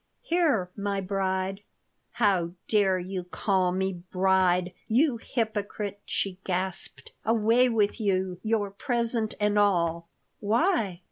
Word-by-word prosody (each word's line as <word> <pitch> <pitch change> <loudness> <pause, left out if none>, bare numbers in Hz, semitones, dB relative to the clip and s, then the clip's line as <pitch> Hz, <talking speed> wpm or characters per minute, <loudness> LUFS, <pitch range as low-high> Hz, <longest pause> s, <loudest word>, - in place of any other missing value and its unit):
"Here, 295 - +1
my 200 -1 -2
bride!" 190 0 -1 0.5
"How 185 -6 +1
dare 200 -3 +3
you 185 0 -4
call 185 0 0
me 190 +1 -1 0.2
'bride,' 185 -1 +2
you 255 +3 +3
hypocrite?" 210 -3 -3
she 190 -2 -2
gasped. 185 0 -3
"Away 230 +3 +3
with 220 0 +1
you, 185 -3 0
your 215 -3 0
present 230 +1 -1
and 210 0 +2
all!" 170 -4 +2 0.3
"Why? 220 - +1
200 Hz, 115 wpm, -27 LUFS, 185-220 Hz, 0.5 s, dare